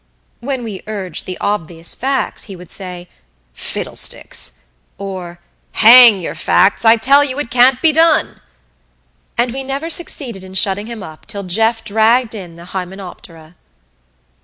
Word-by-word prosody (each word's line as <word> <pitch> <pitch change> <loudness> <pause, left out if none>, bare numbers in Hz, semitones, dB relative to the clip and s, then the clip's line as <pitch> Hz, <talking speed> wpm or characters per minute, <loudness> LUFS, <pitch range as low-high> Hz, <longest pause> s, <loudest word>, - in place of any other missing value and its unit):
When 260 0 -4
we 210 -5 -7
urged 195 -6 -6
the 185 - -5
obvious 170 -5 -3
facts 270 +1 -2
he 195 - -10
would 180 -1 -13
say: 180 -2 -6 0.5
"Fiddlesticks!" - - -2 0.3
or 185 -3 -7 0.3
"Hang 230 -2 +8
your 175 - -5
facts 200 - +2
I 225 0 +6
tell 275 +6 +4
you 270 -2 -3
it 290 -5 -3
can't 250 +1 +4
be 320 - +5
done!" 320 +1 +2 1.0
And 240 0 0
we 270 +1 -5
never 275 +5 -4
succeeded 255 - 0
in 190 0 -12
shutting 195 +2 +2
him 230 -4 -8
up 155 -4 -12
till 200 -1 -6
Jeff 225 +5 +1
dragged 225 +3 +2
in 180 -6 -9
the 170 +1 -13
hymenoptera. 180 -3 -9
210 Hz, 145 wpm, -16 LUFS, 185-250 Hz, 1.0 s, Hang